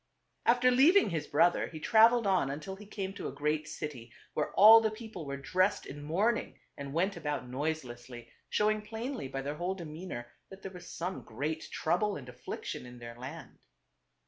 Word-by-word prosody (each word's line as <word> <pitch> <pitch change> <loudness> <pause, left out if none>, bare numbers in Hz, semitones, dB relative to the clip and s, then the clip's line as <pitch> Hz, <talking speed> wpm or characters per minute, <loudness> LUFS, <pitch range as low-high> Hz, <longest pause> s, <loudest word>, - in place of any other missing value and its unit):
After 245 +1 +5
leaving 295 - +5
his 160 -3 -2
brother 170 +4 +3
he 160 - -8
traveled 230 +5 +5
on 185 -8 +2
until 155 +7 -5
he 205 +1 -13
came 195 -2 -4
to - - -5
a - - -4
great 150 +2 -1
city 145 -7 -6 0.2
where 150 - -1
all 220 +3 +9
the 220 - +2
people 215 -7 -8
were 140 0 -3
dressed 185 +8 +1
in 145 +2 -8
mourning 195 +11 0 0.2
and 140 -1 -7
went 185 +6 0
about 145 -4 -3
noiselessly, 125 -4 -5 0.2
showing 215 0 +2
plainly 225 - -5
by 135 0 -4
their 145 +2 -4
whole 180 +3 -2
demeanor 160 -7 -7 0.2
that 190 0 -12
there 195 - -6
was 180 -2 -11
some 180 +3 -4
great 150 +8 -4
trouble 185 +6 0
and 130 -3 -8
affliction 125 0 -6
in 125 0 -11
their 120 -1 -8
land. 135 +6 -9
165 Hz, 180 wpm, -31 LUFS, 140-210 Hz, 0.2 s, all